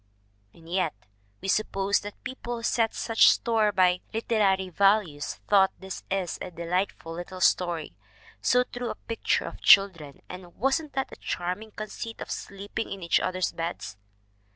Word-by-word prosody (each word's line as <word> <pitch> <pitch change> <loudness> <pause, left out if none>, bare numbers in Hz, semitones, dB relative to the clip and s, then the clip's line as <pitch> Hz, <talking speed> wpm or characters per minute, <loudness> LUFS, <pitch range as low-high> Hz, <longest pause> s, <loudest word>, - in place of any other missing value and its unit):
And 165 +6 -18
yet 175 - 0 0.5
we - - -5
suppose 195 0 +1
the 205 0 -7
people 240 -2 -5
who 230 - -8
set 230 -1 +1
such 225 -1 +5
store 225 -3 +2
by 180 -2 +3
"literary" 205 -4 +1
values 190 -5 +2
thought 195 -2 +5
this 190 0 -7
a 190 -1 -2
"delightful 170 0 -2
little 175 +2 -7
story" 170 - +1 0.5
"so 250 0 +4
true 245 -1 -5
a - - -4
picture 230 - -1
of - - -8
children" 170 -8 +5
"and 180 -1 -10
wasn't 280 +5 0
that 270 -1 -2
a - - -8
charm 180 +3 -3
ing 220 0 -11
conceit 215 +2 -6
of - - -6
sleeping 200 +3 -5
in 195 -2 -6
each 170 - +3
other's 185 -1 -1
beds!" 165 - -5
195 Hz, 155 wpm, -27 LUFS, 175-220 Hz, 0.5 s, such